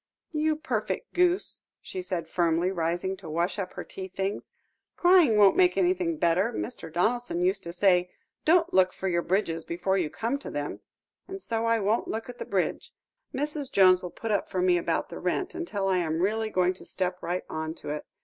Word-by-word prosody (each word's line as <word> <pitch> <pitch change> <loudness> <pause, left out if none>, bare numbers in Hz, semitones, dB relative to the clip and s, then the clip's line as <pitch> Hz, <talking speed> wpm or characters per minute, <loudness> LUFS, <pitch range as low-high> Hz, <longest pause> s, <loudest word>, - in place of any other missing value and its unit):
"You 310 0 +1
perfect 320 +9 -3
goose," 360 +2 +2 0.2
she 185 - -6
said 180 -3 -3
firmly, 170 +1 +1
rising 175 +2 -1
to 185 -4 -10
wash 170 +5 -1
up 185 -2 -4
her - - -6
tea 190 -1 -7
things; 195 +2 -4 0.5
"crying 350 - +5
won't 200 -2 +6
make 365 -1 +4
anything 355 -2 +1
better. 185 - +2
Mr. 220 -8 -5
Donaldson 200 +1 0
used 190 +2 +1
to 170 - -4
say, 180 0 +3 0.3
'Don't 335 +2 +3
look 185 -1 +4
for 190 - -4
your 170 -2 +1
bridges 170 -3 0
before 190 +3 -1
you 165 -4 -1
come 235 - -2
to - - -7
them,' 145 0 -4 0.5
and 385 +1 -6
so 230 -9 -2
I 230 0 +3
won't 210 +3 +1
look 225 +1 -4
at 245 - -9
the - - -4
bridge. - - -1 0.4
Mrs. 290 0 -3
Jones 185 -2 +6
will 180 - -5
put 225 +5 -5
up 205 - 0
for 185 - -2
me 180 -1 +4
about - - -1
the - - -7
rent, 380 - -1
until 280 - -3
I 190 -1 +2
am 160 -2 -1
really 215 +4 0
going 185 -2 +2
to 185 - -13
step 180 -1 -2
right 175 +2 -2
on 160 0 -4
to 145 - -7
it. 150 - -5
190 Hz, 205 wpm, -27 LUFS, 175-245 Hz, 0.5 s, won't